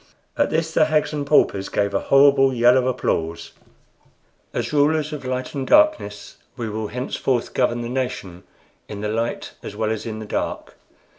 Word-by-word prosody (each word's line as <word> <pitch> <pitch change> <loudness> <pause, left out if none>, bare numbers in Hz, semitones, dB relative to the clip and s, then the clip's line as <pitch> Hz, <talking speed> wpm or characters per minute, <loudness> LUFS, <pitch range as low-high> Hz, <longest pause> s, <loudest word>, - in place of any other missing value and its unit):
At - - +1
this 160 0 -1
the 155 - +4
hags 155 0 0
and 145 -1 -3
paupers 100 -9 +2
gave 100 -1 0
a 100 - +2
horrible 140 -1 +5
yell 120 0 +4
of 130 -1 +2
applause. 85 -10 -2 1.0
"As - - -3
rulers 150 +1 +2
of 145 -3 -7
Light 130 0 -3
and 135 -2 -4
Darkness, 300 - +2 0.2
we 115 - -3
will 110 0 -3
henceforth 125 +1 -2
govern 120 -1 +1
the 120 - -4
nation 120 -8 -4 0.5
in 105 -1 -7
the 105 - -2
light 115 +2 -3
as 105 - -8
well 110 0 -1
as 110 +1 -4
in 110 -1 -5
the 110 - -7
dark. - - -4
125 Hz, 175 wpm, -22 LUFS, 110-145 Hz, 1.0 s, horrible